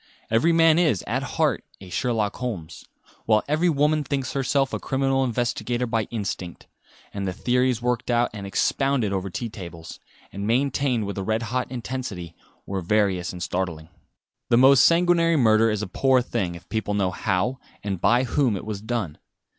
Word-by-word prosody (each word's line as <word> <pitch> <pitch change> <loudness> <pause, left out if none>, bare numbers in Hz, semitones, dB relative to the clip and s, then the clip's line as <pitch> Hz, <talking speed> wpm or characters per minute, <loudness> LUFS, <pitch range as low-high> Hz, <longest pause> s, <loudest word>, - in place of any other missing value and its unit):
Every 115 +10 +3
man 165 0 +5
is 150 - +2
at - - -1
heart - - 0 0.2
a 95 -2 -12
Sherlock 110 0 -1
Holmes, 105 -11 -5 0.4
while 110 -1 +4
every 155 +5 +2
woman 150 0 +2
thinks 135 -2 -3
herself 135 0 0
a - - -1
criminal 135 0 0
investigator 120 0 -1
by 115 -2 -1
instinct; 95 -6 -5 0.5
and 100 -1 -3
the 90 - -2
theories 125 +2 +1
worked 125 0 -1
out 120 0 +2
and 100 -2 -6
expounded 130 +1 +1
over 95 0 -2
tea 115 +6 -4
tables, 85 -6 -9 0.3
and 100 +1 -4
maintained 130 -1 +1
with 100 0 -4
a - - -3
red 110 +3 -1
hot 130 0 -1
intensity, 120 -9 -5 0.3
were 95 -1 -3
various 95 -2 +1
and 90 -1 -6
startling. 85 -4 -3 0.6
The 120 - +4
most 135 +1 +7
sanguinary 170 -1 +4
murder 115 -4 +4
is 105 -1 -1
a - - -4
poor 130 +7 +3
thing 90 -7 -2
if 85 - -13
people 110 -2 -2
know 95 -2 +1
how 105 +8 -1 0.2
and 95 -4 -3
by 120 +2 +4
whom 125 -4 +1
it 95 - -8
was 105 -2 -5
done. 110 -8 -3
115 Hz, 175 wpm, -24 LUFS, 100-130 Hz, 0.6 s, most